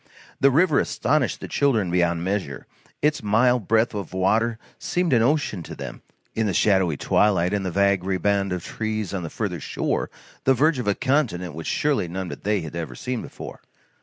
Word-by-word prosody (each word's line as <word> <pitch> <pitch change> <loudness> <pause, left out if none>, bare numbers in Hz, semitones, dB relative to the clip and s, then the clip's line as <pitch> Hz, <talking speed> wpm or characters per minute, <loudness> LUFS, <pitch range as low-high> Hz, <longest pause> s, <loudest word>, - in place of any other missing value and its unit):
The 140 - +5
river 155 +2 +3
astonished 155 +1 0
the - - -5
children 115 -11 +1
beyond 85 -1 +1
measure. 95 -8 -3 0.4
Its 150 0 +2
mile 115 +4 +3
breadth 115 +2 +1
of 100 -4 -5
water 110 +5 +1 0.2
seemed 175 -4 0
an 115 - +4
ocean 130 - +1
to - - -8
them, - - -8 0.3
in 110 -1 0
the 95 - -1
shadowy 95 -7 +3
twilight, 95 0 +2
and 100 -1 0
the 95 - -1
vague 100 0 +2
riband 95 +1 0
of 90 -2 -3
trees 110 -3 -3
on 95 - -2
the 85 - -5
further 95 -4 -3
shore, - - -2 0.3
the 135 - +4
verge 150 +2 +2
of 125 - -4
a 100 - +2
continent 110 - 0
which 80 +1 -7
surely 145 -11 +1
none 90 +1 -4
but - - -8
they 105 -1 +1
had 80 0 -7
ever 85 -1 -5
seen 125 -2 -3
before. - - -9
100 Hz, 195 wpm, -24 LUFS, 90-125 Hz, 0.4 s, The